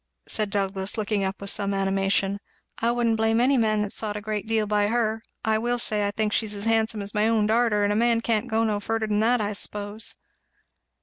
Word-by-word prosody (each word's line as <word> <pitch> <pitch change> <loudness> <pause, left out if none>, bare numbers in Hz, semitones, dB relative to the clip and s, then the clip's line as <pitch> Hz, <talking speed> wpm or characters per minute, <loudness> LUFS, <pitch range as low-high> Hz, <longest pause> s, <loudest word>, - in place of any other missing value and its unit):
said 215 -1 0
Douglass, 195 -1 -2
looking 210 -1 -1
up 190 +1 -3
with 200 0 -1
some 200 -1 0
animation. 195 0 0 0.4
"I 230 - +1
wouldn't 235 -2 +1
blame 225 +1 +2
any 260 +3 +3
man 215 -3 +2
that 205 - -4
sot 210 -1 -2
a - - -6
good 215 0 -4
deal 220 -1 +1
by 205 0 +1
her. 225 -1 0 0.2
I 220 0 +2
will 240 +2 0
say 210 -3 +1
I - - 0
think 210 +1 -1
she's 210 -2 -1
as 200 - -5
handsome 225 -1 +1
as 200 - -2
my 210 0 +2
own 225 -2 +2
darter; 220 -1 +2
and 205 0 +2
a - - -1
man 230 +1 +2
can't 230 0 0
go 225 +1 +1
no 215 -2 0
furder 225 +2 -2
than 210 -1 0
that 240 +3 +3
I 210 0 -2
suppose." 205 +1 -3
215 Hz, 230 wpm, -25 LUFS, 205-225 Hz, 0.4 s, any